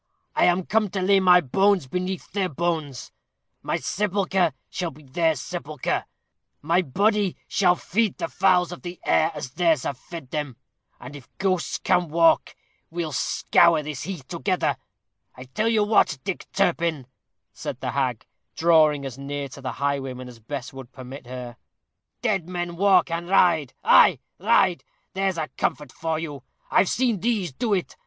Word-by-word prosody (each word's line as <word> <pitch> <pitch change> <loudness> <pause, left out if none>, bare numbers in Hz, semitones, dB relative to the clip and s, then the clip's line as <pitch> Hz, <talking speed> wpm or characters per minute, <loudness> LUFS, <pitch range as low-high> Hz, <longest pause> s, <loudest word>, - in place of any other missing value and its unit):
I - - +4
am 180 0 +2
come 215 0 +1
to 190 0 -3
lay 195 +1 +4
my 180 -1 +6
bones 190 +5 +2
beneath 180 +6 -4
their 195 -2 -1
bones 155 -4 -3 0.5
my - - -1
sepulchre 190 -3 0 0.2
shall 180 -2 -3
be 150 0 -15
their 160 +4 +1
sepulchre; 150 0 -3 0.5
my 170 +5 +2
body 200 - +1
shall 180 -3 +3
feed 210 +3 -1
the - - -2
fowls 180 -1 +2
of 175 - -8
the 175 0 -8
air 160 +1 +3
as 140 -4 -6
theirs 165 -3 +2
have 135 -3 -4
fed 165 -8 -10
them. 145 -6 -4 0.4
And 125 +4 -10
if 135 -6 -12
ghosts 185 -3 0
can 175 -1 +1
walk, 165 +1 +3 0.3
we'll 165 -2 -3
scour 165 +3 +3
this 150 -3 -6
heath 175 -9 -6
together. 180 +2 -1 0.6
I 125 - -9
tell 130 - -2
you 220 -2 +3
what, 205 -8 +3
Dick 195 - -4
Turpin," 170 -7 0 0.5
said - - -6
the - - -3
hag, 130 -4 -1 0.3
drawing 155 -4 +4
as 135 -1 -7
near 140 0 -4
to 140 +1 -11
the 130 - -4
highwayman 135 -3 -3
as 120 -2 -12
Bess 130 +3 -6
would 135 -2 -10
permit 130 0 -10
her; 125 -1 -7 0.7
"dead 195 -7 0
men 175 -1 -4
walk 190 -1 +4
and 170 +1 -3
ride 170 -8 +3
ay, - - +6 0.2
ride! 180 -2 +3 0.3
there's 190 -1 -1
a 155 -1 -3
comfort 150 -3 -2
for 160 +2 -2
you. 150 -4 -6 0.3
I've 190 - +4
seen 240 -5 +1
these 205 - -1
do 215 - 0
it. 185 - -4
170 Hz, 165 wpm, -24 LUFS, 140-185 Hz, 0.7 s, my